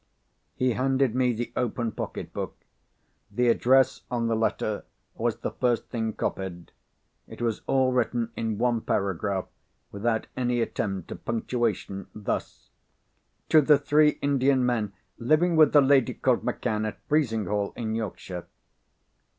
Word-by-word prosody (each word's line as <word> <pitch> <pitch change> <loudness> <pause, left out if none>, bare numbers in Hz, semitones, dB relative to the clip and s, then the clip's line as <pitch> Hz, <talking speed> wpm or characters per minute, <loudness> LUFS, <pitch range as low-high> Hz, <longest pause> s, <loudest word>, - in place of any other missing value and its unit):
He 125 -1 +1
handed 130 0 +1
me 125 0 +2
the 120 +1 -4
open 120 -1 -1
pocket - - -6
book. - - -4 0.7
The 125 0 +1
address 130 +3 +4
on 120 -2 -1
the 115 -1 +1
letter 110 -1 -1 0.3
was - - -1
the - - -4
first 120 -3 0
thing 110 -2 -2
copied. 90 -4 -4 0.6
It - - -11
was 115 -2 -1
all 130 -1 +3
written 120 -2 0
in 110 -2 -2
one 120 -1 +1
paragraph, 95 -1 -1 0.5
without 110 +2 -1
any 125 -1 0
attempt 95 -5 -2
at - - -8
punctuation, 115 -4 -2
thus: 105 -2 -4 0.8
"To 155 - +7
the 150 0 +5
three 150 +1 +3
Indian 135 -2 +3
men 110 -5 0 0.3
living 155 +7 +3
with 155 -2 +6
the 145 - +7
lady 135 -2 +3
called - - +1
Macann 105 0 -1
at 110 - -6
Frizinghall 110 - 0
in 110 -2 -3
Yorkshire." 95 -5 -5
120 Hz, 140 wpm, -26 LUFS, 110-130 Hz, 0.8 s, To